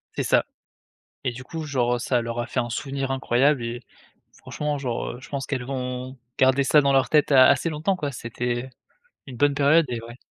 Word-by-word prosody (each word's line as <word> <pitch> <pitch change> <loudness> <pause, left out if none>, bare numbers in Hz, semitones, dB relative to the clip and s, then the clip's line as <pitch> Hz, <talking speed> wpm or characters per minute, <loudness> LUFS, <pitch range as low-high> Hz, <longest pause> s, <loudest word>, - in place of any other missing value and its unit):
C'est - - -1
ça - - +3 0.8
et 125 - +1
du 130 +2 -9
coup 160 +3 -6
genre, 125 -4 0
heu, - - -1
ça 125 0 +1
leur 115 0 -3
a - - -3
fait - - -4
un 120 - -3
souvenir 135 +2 -3
incroyable 130 +1 +2
et 120 +1 -4 0.6
franchement 150 -1 -4
genre, 125 -4 -3
heu, 120 - -10
je - - -13
pense 140 -2 -4
qu'elles 130 -3 -3
vont 130 0 -5 0.2
garder 130 +1 +4
ça 150 +3 +5
dans 140 -1 +2
leur 135 -1 +3
tête, 150 -1 +3
a 130 -1 +8
assez 140 +4 +3
longtemps 155 +6 0
quoi, 145 -4 -3
c'était 120 +2 -4 0.6
une 125 -3 -9
bonne 145 +1 +3
période 145 +3 +4
et 120 -2 -3
ouais. 120 +1 -11
130 Hz, 215 wpm, -24 LUFS, 120-140 Hz, 0.8 s, a